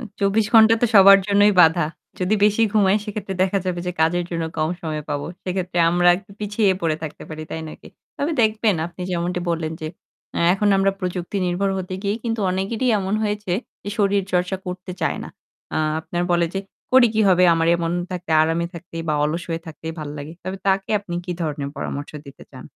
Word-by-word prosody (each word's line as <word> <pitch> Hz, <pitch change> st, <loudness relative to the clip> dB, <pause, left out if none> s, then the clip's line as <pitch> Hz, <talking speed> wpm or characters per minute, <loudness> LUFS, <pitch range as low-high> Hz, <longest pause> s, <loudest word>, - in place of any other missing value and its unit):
উ -, -, -7 dB, 0.2 s
২৪ 200 Hz, +2 st, +2 dB
ঘণ্টা 225 Hz, 0 st, +8 dB
তো -, -, +5 dB
সবার 195 Hz, 0 st, +9 dB
জন্যই 205 Hz, 0 st, +4 dB
বাঁধা। 165 Hz, -1 st, +5 dB, 0.3 s
যদি 185 Hz, +3 st, +1 dB
বেশি 210 Hz, +2 st, +3 dB
ঘুমাই, 200 Hz, -2 st, +4 dB
সেক্ষেত্রে 205 Hz, -2 st, -5 dB
দেখা 190 Hz, +1 st, +1 dB
যাবে 180 Hz, -1 st, -2 dB
যে 180 Hz, -, -1 dB
কাজের 175 Hz, +2 st, +2 dB
জন্য 165 Hz, -1 st, -2 dB
কম 155 Hz, 0 st, +1 dB
সময় 155 Hz, -2 st, -4 dB
পাবো। 145 Hz, 0 st, -3 dB, 0.2 s
সেক্ষেত্রে 180 Hz, -1 st, -3 dB
আমরা 175 Hz, +1 st, +3 dB
একটু 195 Hz, +2 st, -13 dB
পিছিয়ে 210 Hz, 0 st, +1 dB
পড়ে 160 Hz, -2 st, 0 dB
থাকতে 155 Hz, -2 st, -7 dB
পারি, 155 Hz, 0 st, -7 dB
তাই 160 Hz, -, -4 dB
নয় 155 Hz, -, -9 dB
কি? -, -, -12 dB, 0.3 s
তবে 295 Hz, +4 st, -1 dB
দেখবেন 215 Hz, -2 st, +2 dB
আপনি 175 Hz, +2 st, -13 dB
যেমনটি 175 Hz, 0 st, -1 dB
বললেন 160 Hz, -1 st, -2 dB
যে -, -, -3 dB, 0.5 s
এ্যা -, -, 0 dB
এখন 205 Hz, +1 st, +1 dB
আমরা 195 Hz, 0 st, +3 dB
প্রযুক্তি 180 Hz, +1 st, -3 dB
নির্ভর 185 Hz, +3 st, 0 dB
হতে 185 Hz, 0 st, -5 dB
গিয়েই 205 Hz, +2 st, -1 dB
কিন্তু 225 Hz, -1 st, -1 dB
অনেকেরই 200 Hz, +7 st, -1 dB
এমন 195 Hz, +1 st, -2 dB
হয়েছে 210 Hz, -3 st, -2 dB, 0.3 s
এ -, -, -2 dB
শরীরচর্চা 190 Hz, -2 st, +1 dB
করতে 180 Hz, 0 st, -6 dB
চায় -, -, 0 dB
না। -, -, -7 dB, 0.4 s
অ্যা -, -, 0 dB, 0.2 s
আপনার 175 Hz, +2 st, -3 dB
বলে 170 Hz, -1 st, +3 dB
যে, -, -, 0 dB, 0.3 s
"করে 255 Hz, -2 st, +7 dB
কি 220 Hz, -, +2 dB
হবে? 180 Hz, -1 st, +5 dB
আমার 165 Hz, 0 st, +1 dB
এমন 170 Hz, -1 st, -2 dB, 0.2 s
থাকতে, 180 Hz, -2 st, -6 dB
আরামে 165 Hz, +2 st, 0 dB
থাকতেই 170 Hz, -1 st, -7 dB
বা 155 Hz, -, +2 dB
অলস 160 Hz, +3 st, -2 dB
হয়ে 165 Hz, -1 st, -2 dB
থাকতেই 160 Hz, 0 st, -7 dB
ভাল 155 Hz, -1 st, -5 dB
লাগে।" 145 Hz, +2 st, -7 dB
তবে 185 Hz, +1 st, -4 dB
তাকে 195 Hz, 0 st, +1 dB
আপনি 190 Hz, -4 st, -7 dB
কি 180 Hz, -, -3 dB
ধরনের 145 Hz, -3 st, -3 dB
পরামর্শ 145 Hz, +1 st, -5 dB, 0.2 s
দিতে 140 Hz, -, -13 dB
চান? 130 Hz, -, -11 dB
180 Hz, 205 wpm, -22 LUFS, 165-200 Hz, 0.5 s, সবার